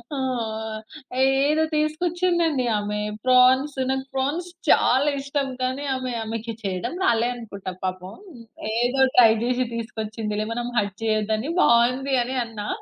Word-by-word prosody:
ఆ! -, -, -4 dB, 1.1 s
ఏదో 280 Hz, +4 st, +3 dB
తీసుకొచ్చిందండి 330 Hz, -1 st, +1 dB
ఆమె 210 Hz, 0 st, -3 dB, 0.3 s
ప్రాన్స్. 255 Hz, +3 st, +5 dB
నాకు 265 Hz, 0 st, -1 dB
ప్రాన్స్ 285 Hz, +7 st, -1 dB, 0.2 s
చాలా 270 Hz, +4 st, +4 dB
ఇష్టం, 280 Hz, 0 st, -2 dB
కానీ 260 Hz, +3 st, -1 dB
ఆమె 255 Hz, -1 st, -3 dB
ఆమెకి 225 Hz, +1 st, -4 dB
చెయడం 185 Hz, -, -3 dB
రాలే 235 Hz, -3 st, +3 dB
అనుకుంటా 200 Hz, -5 st, -7 dB
పాపం. 185 Hz, +1 st, -4 dB, 0.6 s
ఏదో 245 Hz, +3 st, +1 dB, 0.2 s
ట్రై 235 Hz, -2 st, +8 dB
జేషి 250 Hz, +1 st, +1 dB
తీసుకొచ్చిందిలే 220 Hz, -2 st, -4 dB
మనం 240 Hz, 0 st, -3 dB
హర్ట్ 200 Hz, -1 st, 0 dB
చెయ్యొద్దని 220 Hz, +5 st, 0 dB
బావుంది 250 Hz, +3 st, +3 dB
అని 255 Hz, +2 st, -4 dB
అన్నా. 210 Hz, -2 st, -7 dB
250 Hz, 120 wpm, -24 LUFS, 220-275 Hz, 1.1 s, ట్రై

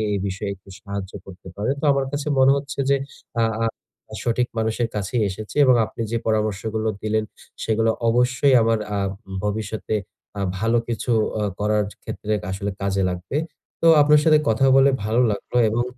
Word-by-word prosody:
এ -, -, 0 dB
বিষয়ে 100 Hz, +1 st, -3 dB
একটু 95 Hz, +1 st, -20 dB
সাহায্য 100 Hz, -1 st, -6 dB
করতে 95 Hz, -1 st, -13 dB
পারেন। 110 Hz, +7 st, 0 dB
তো -, -, -1 dB
আমার 135 Hz, -1 st, +1 dB
কাছে 145 Hz, 0 st, -3 dB
মনে 130 Hz, +1 st, +6 dB
হচ্ছে 140 Hz, 0 st, -6 dB
যে, 140 Hz, -, +4 dB, 0.4 s
আ -, -, +4 dB, 0.2 s
আ -, -, +2 dB, 0.6 s
সঠিক 120 Hz, +1 st, +1 dB
মানুষের 110 Hz, +1 st, 0 dB
কাছেই 105 Hz, +4 st, -1 dB
এসেছি। 105 Hz, +6 st, -8 dB
এবং 130 Hz, -1 st, +6 dB
আপনি 115 Hz, -, -8 dB
যে, 115 Hz, -, +1 dB
পরামর্শগুলো 110 Hz, 0 st, -1 dB
দিলেন, 110 Hz, 0 st, 0 dB, 0.4 s
সেগুলো 115 Hz, 0 st, +2 dB, 0.2 s
অবশ্যই 125 Hz, +3 st, +3 dB
আমার 115 Hz, -1 st, +2 dB, 0.2 s
আহ 100 Hz, -1 st, 0 dB, 0.4 s
ভবিষ্যতে 110 Hz, +1 st, -2 dB, 0.4 s
আহ 100 Hz, -, 0 dB
ভালো 115 Hz, +2 st, +2 dB
কিছু 120 Hz, +1 st, -2 dB, 0.3 s
অ -, -, -1 dB, 0.2 s
করার 105 Hz, 0 st, +1 dB, 0.2 s
ক্ষেত্রে 110 Hz, 0 st, -4 dB, 0.2 s
আসলে 100 Hz, +1 st, -3 dB
কাজে 100 Hz, 0 st, 0 dB
লাগবে। 90 Hz, +10 st, -4 dB, 0.4 s
তো 165 Hz, -, +4 dB
আপনার 150 Hz, +1 st, +6 dB
সাথে 155 Hz, -1 st, +6 dB
কথা 110 Hz, +5 st, +3 dB
বলে 135 Hz, +1 st, +6 dB
ভালো 110 Hz, +4 st, +2 dB
লাগলো। 105 Hz, +4 st, -3 dB
এবং 120 Hz, +2 st, 0 dB
110 Hz, 170 wpm, -22 LUFS, 100-125 Hz, 0.6 s, মনে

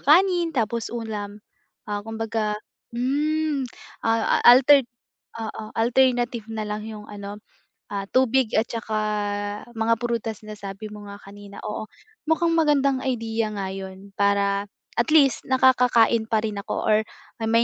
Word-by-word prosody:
kanin 345 Hz, +1 st, +4 dB
tapos 230 Hz, 0 st, 0 dB
ulam. 215 Hz, -3 st, -5 dB, 0.4 s
Ah, 205 Hz, -1 st, -3 dB
kumbaga 220 Hz, -1 st, -2 dB, 0.4 s
hmm 290 Hz, +2 st, 0 dB, 0.3 s
ah, 225 Hz, 0 st, +2 dB
alterd 265 Hz, +1 st, +7 dB, 0.5 s
oo, 220 Hz, -1 st, -5 dB
alternative 240 Hz, -1 st, +2 dB
na 220 Hz, -1 st, -4 dB
lang 210 Hz, 0 st, -4 dB
yung 210 Hz, -1 st, -8 dB
ano 205 Hz, 0 st, -7 dB, 0.5 s
ah, 200 Hz, -1 st, -3 dB
tubig 255 Hz, -2 st, +3 dB
at 220 Hz, +2 st, +2 dB
tsaka, 220 Hz, -2 st, -2 dB, 0.7 s
mga 225 Hz, 0 st, +1 dB
prutas 230 Hz, -3 st, -2 dB, 0.2 s
sabi 200 Hz, +2 st, -7 dB
mo 210 Hz, -1 st, -10 dB
nga 200 Hz, -, -8 dB
kanina. 200 Hz, 0 st, -12 dB
Oo, 215 Hz, 0 st, -4 dB, 0.4 s
mukhang 330 Hz, +1 st, +2 dB
magandang 280 Hz, -4 st, +3 dB
idea 230 Hz, -4 st, -1 dB
nga 195 Hz, -1 st, -3 dB
yun 190 Hz, +1 st, -8 dB
para 200 Hz, 0 st, +2 dB, 0.3 s
at 235 Hz, -, +2 dB
least 275 Hz, -6 st, +4 dB
nakakakain 250 Hz, -3 st, +4 dB
pa 220 Hz, -1 st, +1 dB
rin 210 Hz, -2 st, -3 dB
ako -, -, -4 dB
or 215 Hz, -1 st, +4 dB, 0.4 s
may 230 Hz, +1 st, +3 dB
225 Hz, 135 wpm, -24 LUFS, 210-255 Hz, 0.7 s, alterd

